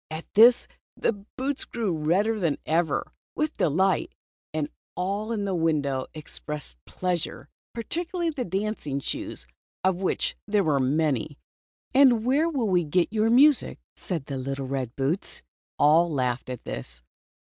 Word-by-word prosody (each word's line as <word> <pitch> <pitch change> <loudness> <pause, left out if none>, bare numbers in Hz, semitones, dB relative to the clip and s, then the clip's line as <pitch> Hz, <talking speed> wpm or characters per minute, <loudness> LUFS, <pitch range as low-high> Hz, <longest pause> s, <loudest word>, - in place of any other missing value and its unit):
At 155 +1 -6
this 235 +4 +7 0.3
the - - +2
boots 255 +7 -4
grew 220 -8 -2
redder 190 +9 +1
than 165 -6 +1
ever 165 +1 0 0.2
with 305 +1 -1
delight, 185 +4 +1 0.4
and 155 -2 -1 0.3
all 200 +5 -2
in 210 -3 -1
the 195 - -1
window 150 -6 0
expressed 150 - -7
pleasure, 180 -3 -3 0.3
particularly 340 - -2
the 280 -5 -3
dancing 190 - -2
shoes, 65 - -5 0.4
of 190 -1 +2
which 190 - 0
there 205 -1 +2
were 150 -4 +2
many. 145 0 0 0.6
"And 255 -4 +5
where 290 +6 +3
will 235 - 0
you 175 - +4
get 175 +6 +1
your 220 0 +2
music?" 275 +4 +5 0.2
said 165 -7 -4
the 135 -3 -4 0.2
red 130 -3 -3
boots. 140 +8 -2 0.3
All 165 +3 +5
laughed 130 -3 -1
at 125 -2 -6
this. - - -7
180 Hz, 140 wpm, -26 LUFS, 145-220 Hz, 0.6 s, this